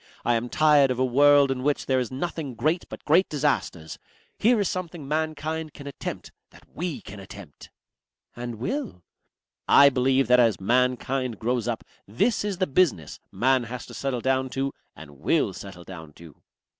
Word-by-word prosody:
I 120 Hz, -, +3 dB
am 120 Hz, +1 st, -1 dB
tired 150 Hz, -2 st, +4 dB
of 125 Hz, -, -1 dB
a 130 Hz, -, +2 dB
world 140 Hz, +2 st, +5 dB
in 130 Hz, -1 st, -2 dB
which 145 Hz, +2 st, 0 dB
there 130 Hz, -1 st, +1 dB
is 125 Hz, -, -2 dB
nothing 140 Hz, -1 st, -4 dB
great 160 Hz, +8 st, 0 dB
but -, -, -10 dB
great 170 Hz, +5 st, +4 dB
disasters. 140 Hz, -, -2 dB, 0.4 s
Here 235 Hz, +1 st, +4 dB
is 200 Hz, -, +1 dB
something 170 Hz, -5 st, -5 dB
mankind 155 Hz, +1 st, -3 dB
can 140 Hz, -, -10 dB
attempt, 140 Hz, -, -7 dB, 0.2 s
that -, -, -18 dB
we 170 Hz, -3 st, -4 dB
can 105 Hz, -, -10 dB
attempt." 95 Hz, -5 st, -12 dB, 0.7 s
"And 120 Hz, -1 st, -5 dB
will?" 200 Hz, -, -4 dB, 0.6 s
"I 140 Hz, 0 st, +8 dB
believe 130 Hz, 0 st, +2 dB
that 125 Hz, +1 st, +5 dB
as 115 Hz, -3 st, +3 dB
Mankind 125 Hz, +2 st, 0 dB
grows 120 Hz, +1 st, -1 dB
up 115 Hz, -2 st, -3 dB, 0.2 s
this 200 Hz, -, 0 dB
is 205 Hz, -3 st, -2 dB
the 185 Hz, -, +1 dB
business 140 Hz, -, 0 dB
Man 125 Hz, +4 st, +2 dB
has 125 Hz, 0 st, -7 dB
to -, -, -12 dB
settle 135 Hz, -3 st, -3 dB
down 130 Hz, 0 st, 0 dB
to 135 Hz, 0 st, -1 dB, 0.2 s
and 70 Hz, -2 st, -13 dB
will -, -, +1 dB
settle 95 Hz, -3 st, -10 dB
down 80 Hz, -5 st, -11 dB
to." 80 Hz, -3 st, -15 dB
130 Hz, 175 wpm, -25 LUFS, 115-150 Hz, 0.7 s, I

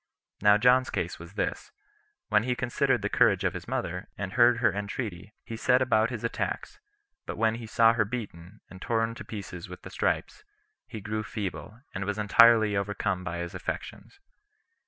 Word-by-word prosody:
Now 105 Hz, 0 st, +6 dB
John's 125 Hz, +3 st, +4 dB
case -, -, -3 dB
was -, -, -11 dB
this: -, -, -3 dB, 0.6 s
When 105 Hz, -1 st, +4 dB
he 125 Hz, +2 st, -1 dB
considered 120 Hz, 0 st, 0 dB
the -, -, +1 dB
courage -, -, +3 dB
of -, -, +1 dB
his -, -, -7 dB
mother, 90 Hz, +2 st, -3 dB
and 95 Hz, 0 st, -4 dB
heard 120 Hz, -1 st, +5 dB
her 115 Hz, -5 st, +2 dB
entreaty, 100 Hz, -1 st, -5 dB
he 115 Hz, -, -6 dB
set 125 Hz, +2 st, +3 dB
about 115 Hz, -3 st, +2 dB
his 120 Hz, -3 st, -6 dB
attacks; 115 Hz, -, -3 dB, 0.5 s
but -, -, -5 dB
when 110 Hz, 0 st, +2 dB
he 115 Hz, 0 st, -7 dB
saw 115 Hz, +1 st, +5 dB
her 115 Hz, -2 st, +2 dB
beaten, 105 Hz, -4 st, -7 dB
and 95 Hz, -, -13 dB
torn 115 Hz, -1 st, 0 dB
to 115 Hz, -, -9 dB
pieces 95 Hz, -5 st, -8 dB
with 90 Hz, -, -10 dB
the -, -, -9 dB
stripes, 425 Hz, -, -1 dB, 0.4 s
he 110 Hz, -, -8 dB
grew 110 Hz, +2 st, -3 dB
feeble, 105 Hz, +2 st, -6 dB
and 100 Hz, +1 st, -3 dB
was 105 Hz, +1 st, -2 dB
entirely 110 Hz, 0 st, +5 dB
overcome 100 Hz, -2 st, -1 dB
by 85 Hz, -1 st, -4 dB
his 85 Hz, 0 st, -5 dB
affections. 400 Hz, -, -6 dB
110 Hz, 180 wpm, -28 LUFS, 100-115 Hz, 0.6 s, Now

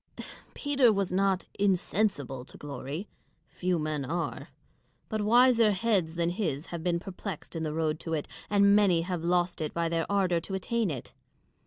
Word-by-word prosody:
Peter 275 Hz, -5 st, +3 dB
was 195 Hz, -3 st, -1 dB
not 195 Hz, 0 st, +2 dB
insensible 185 Hz, -, 0 dB
to -, -, -13 dB
glory; 145 Hz, +6 st, -6 dB, 0.4 s
few 180 Hz, -1 st, -1 dB
men 155 Hz, -2 st, -2 dB
are: 165 Hz, +5 st, -3 dB, 0.6 s
but 220 Hz, -1 st, -1 dB
wiser 235 Hz, +1 st, +5 dB
heads 185 Hz, -5 st, 0 dB
than 170 Hz, 0 st, +1 dB
his 165 Hz, -6 st, -2 dB
have 170 Hz, -2 st, -6 dB
been 170 Hz, 0 st, 0 dB
perplexed 190 Hz, -2 st, -7 dB
in 165 Hz, -, -2 dB
the 155 Hz, -1 st, -2 dB
road 155 Hz, 0 st, -1 dB
to 165 Hz, -1 st, -3 dB
it, 150 Hz, -, -3 dB, 0.2 s
and 200 Hz, 0 st, +5 dB
many 185 Hz, -5 st, +4 dB
have 175 Hz, -2 st, -3 dB
lost 175 Hz, 0 st, +1 dB
it 155 Hz, -, -3 dB
by 170 Hz, 0 st, +1 dB
their 165 Hz, +2 st, -1 dB
ardour 185 Hz, -4 st, +2 dB
to 190 Hz, +3 st, -5 dB
attain 225 Hz, +2 st, 0 dB
it. 135 Hz, -6 st, -6 dB
180 Hz, 170 wpm, -29 LUFS, 160-200 Hz, 0.6 s, wiser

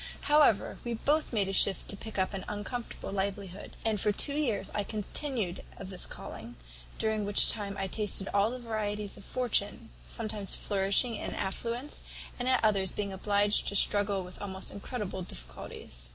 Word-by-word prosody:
"However, 295 Hz, -8 st, +4 dB
we 240 Hz, -1 st, -1 dB
both 300 Hz, +7 st, +2 dB
made 205 Hz, -5 st, +2 dB
a 195 Hz, -, -2 dB
shift 195 Hz, -1 st, +3 dB
to -, -, -3 dB
pick 220 Hz, +1 st, -7 dB
up 190 Hz, +1 st, +1 dB
an 190 Hz, -1 st, -3 dB
uncomfortable 210 Hz, +1 st, -4 dB
livelihood; 195 Hz, -1 st, -3 dB
and 215 Hz, -3 st, +2 dB
for 210 Hz, -, +4 dB
two 280 Hz, +7 st, +1 dB
years 280 Hz, -8 st, 0 dB
I 205 Hz, -, +1 dB
continued 215 Hz, -1 st, -2 dB, 0.2 s
of 195 Hz, 0 st, -7 dB
the 185 Hz, -, -7 dB
calling; 115 Hz, -6 st, -5 dB, 0.4 s
during 220 Hz, -1 st, +1 dB
which 205 Hz, 0 st, +5 dB
time 200 Hz, -2 st, -3 dB
I 195 Hz, -, -1 dB
tasted 200 Hz, 0 st, +1 dB
all 200 Hz, +2 st, +4 dB
the 250 Hz, -, -4 dB
varieties 210 Hz, -3 st, -2 dB
of 200 Hz, -, -11 dB
fortune, 230 Hz, -2 st, 0 dB, 0.2 s
sometimes 210 Hz, -3 st, 0 dB
flourishing 200 Hz, +4 st, +2 dB
in -, -, -3 dB
affluence, 235 Hz, +8 st, -3 dB, 0.4 s
and 245 Hz, -, -1 dB
at 255 Hz, -2 st, +4 dB
others 195 Hz, -3 st, +2 dB
being 200 Hz, -2 st, -2 dB
obliged 205 Hz, +2 st, +3 dB
to 200 Hz, -, 0 dB
struggle 200 Hz, -1 st, +4 dB
with 180 Hz, 0 st, -10 dB
almost 190 Hz, -1 st, -2 dB
incredible 200 Hz, -2 st, -4 dB
difficulties. -, -, -7 dB
205 Hz, 170 wpm, -31 LUFS, 195-225 Hz, 0.4 s, which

